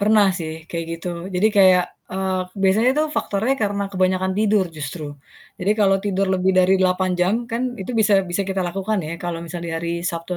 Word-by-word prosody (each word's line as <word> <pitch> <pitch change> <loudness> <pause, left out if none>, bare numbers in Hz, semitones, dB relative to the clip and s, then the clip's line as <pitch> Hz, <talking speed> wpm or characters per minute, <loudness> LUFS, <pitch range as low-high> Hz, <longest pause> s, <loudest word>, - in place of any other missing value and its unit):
Pernah 210 0 +4
sih, 160 -1 -4 0.2
kayak 165 -1 -3
gitu. 165 +2 -5 0.3
Jadi 200 +4 +3
kayak, 185 -2 +6 0.3
eee, 190 -1 -1 0.2
biasanya 215 +6 +4
tuh 310 - +2
faktornya 220 +7 0
karena 200 -1 -1
kebanyakan 185 0 +1
tidur 210 -2 +3
justru. 150 +2 -5 0.5
Jadi 195 +3 +1
kalau 195 -1 +4
tidur 195 -1 0
lebih 190 +1 +2
dari 185 +1 +4
8 185 0 +2
jam, 180 +3 +3 0.2
kan 230 +2 -1 0.2
itu 190 - -5
bisa 205 -2 +4
bisa 190 +3 0
kita 190 0 -2
lakukan 195 +4 -1
ya, 155 -1 -5
kalau 170 -1 -4
misalnya 170 0 -6
hari 170 0 -3
Sabtu 170 +1 -3
190 Hz, 185 wpm, -21 LUFS, 175-200 Hz, 0.5 s, kayak